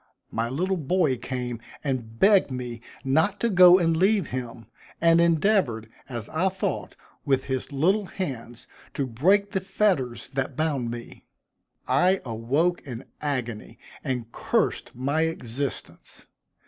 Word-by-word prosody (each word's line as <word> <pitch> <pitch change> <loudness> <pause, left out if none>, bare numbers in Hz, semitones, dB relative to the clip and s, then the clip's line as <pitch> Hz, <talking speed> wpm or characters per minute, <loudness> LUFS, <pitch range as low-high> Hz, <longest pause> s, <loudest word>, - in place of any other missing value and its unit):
My 115 +1 -1
little 185 +9 -1
boy 160 -2 +1
came 125 -2 -4 0.2
and 120 -6 -3
begged 195 - +5
me 125 -3 -5 0.2
not 160 +10 +2
to 235 - +2
go 180 -2 +8
and 165 -3 +2
leave 195 +1 +2
him, 120 -2 -5 0.3
and 165 0 +5
endeavored, 165 - +2 0.2
as 120 -4 -5
I 180 +5 +1
thought, 190 0 -3 0.3
with 135 -2 +1
his 130 +2 -3
little 185 +9 +2
hands 125 -11 -6 0.3
to 140 - 0
break 190 - +2
the 190 - -1
fetters 180 - 0
that 135 -1 -2
bound 145 -6 -1
me. 120 0 -8 0.6
I 185 +2 +3
awoke 135 +10 0
in 125 -2 -8 0.2
agony 125 -7 -3 0.3
and 125 -3 -3
cursed - - 0
my 140 +5 0
existence. 135 -3 -6
140 Hz, 135 wpm, -25 LUFS, 120-180 Hz, 0.6 s, go